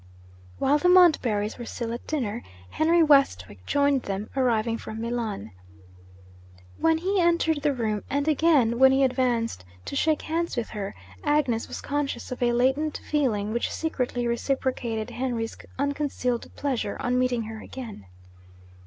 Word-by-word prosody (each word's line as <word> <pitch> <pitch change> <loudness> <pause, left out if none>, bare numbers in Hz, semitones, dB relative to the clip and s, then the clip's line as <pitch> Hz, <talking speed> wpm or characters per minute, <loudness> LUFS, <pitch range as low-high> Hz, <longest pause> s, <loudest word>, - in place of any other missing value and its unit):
While 290 +2 +3
the 360 - +3
Montbarrys 255 - +4
were 240 - -5
still 230 0 -4
at 235 - -7
dinner, 240 -7 -2 0.3
Henry 330 +2 +3
Westwick 100 - +3
joined 280 -2 +2
them, 200 0 -5
arriving 230 -3 +1
from 220 - -7
Milan. 225 - -3 1.3
When 325 0 +3
he 375 +3 +1
entered 335 -3 +2
the 295 0 +2
room, 215 -4 -1
and 285 +2 -1
again 290 -7 +3
when 265 0 +7
he 270 +1 +3
advanced 245 - 0 0.2
to - - -5
shake 310 +1 +1
hands 330 -2 -2
with 235 - -2
her, 200 -2 -5 0.3
Agnes 290 -6 +1
was - - -6
conscious 280 -4 -3
of 255 - -5
a 240 -1 +3
latent 265 +5 +1
feeling 220 -8 0
which 235 - 0
secretly 250 -6 -2
reciprocated 235 -2 -2
Henry's 240 -3 -3 0.2
unconcealed 280 -3 -1
pleasure 260 -7 -2
on 250 0 0
meeting 250 -2 +1
her 220 0 -7
again. 225 - -9
255 Hz, 145 wpm, -26 LUFS, 230-290 Hz, 1.3 s, when